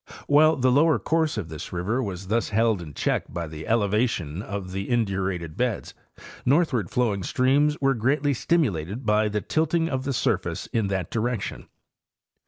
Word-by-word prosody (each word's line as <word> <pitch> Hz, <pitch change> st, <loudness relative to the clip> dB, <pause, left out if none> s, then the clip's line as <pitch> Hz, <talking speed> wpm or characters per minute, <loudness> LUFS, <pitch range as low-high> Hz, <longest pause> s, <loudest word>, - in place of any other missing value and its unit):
While 155 Hz, +2 st, +5 dB
the 130 Hz, -2 st, +2 dB
lower 150 Hz, +4 st, +4 dB
course 160 Hz, -4 st, 0 dB
of 90 Hz, -6 st, -4 dB
this 80 Hz, -1 st, -7 dB
river 100 Hz, +9 st, -1 dB
was 95 Hz, -5 st, -5 dB
thus 115 Hz, +4 st, 0 dB
held 110 Hz, -2 st, +2 dB
in 75 Hz, -4 st, -9 dB
check: -, -, -1 dB
by 85 Hz, -1 st, -3 dB
the 80 Hz, 0 st, -8 dB
elevation 105 Hz, -6 st, 0 dB
of 100 Hz, -3 st, -5 dB
the 95 Hz, +1 st, -4 dB
indurated 95 Hz, -8 st, -1 dB
beds, 125 Hz, -4 st, -2 dB, 0.5 s
northward 130 Hz, -, +2 dB
flowing 110 Hz, -6 st, 0 dB
streams 140 Hz, -, +2 dB
were 135 Hz, -1 st, +3 dB
greatly 140 Hz, +5 st, +1 dB
stimulated 115 Hz, -, 0 dB
by 105 Hz, 0 st, +3 dB
the 105 Hz, 0 st, -1 dB
tilt 160 Hz, -, 0 dB
ing 165 Hz, -1 st, +1 dB
of 130 Hz, -3 st, -2 dB
the 140 Hz, 0 st, -2 dB
surface 115 Hz, -, -1 dB
in 110 Hz, -3 st, +1 dB
that 95 Hz, -3 st, -2 dB
direction. 115 Hz, -2 st, -2 dB
115 Hz, 170 wpm, -25 LUFS, 95-135 Hz, 0.5 s, While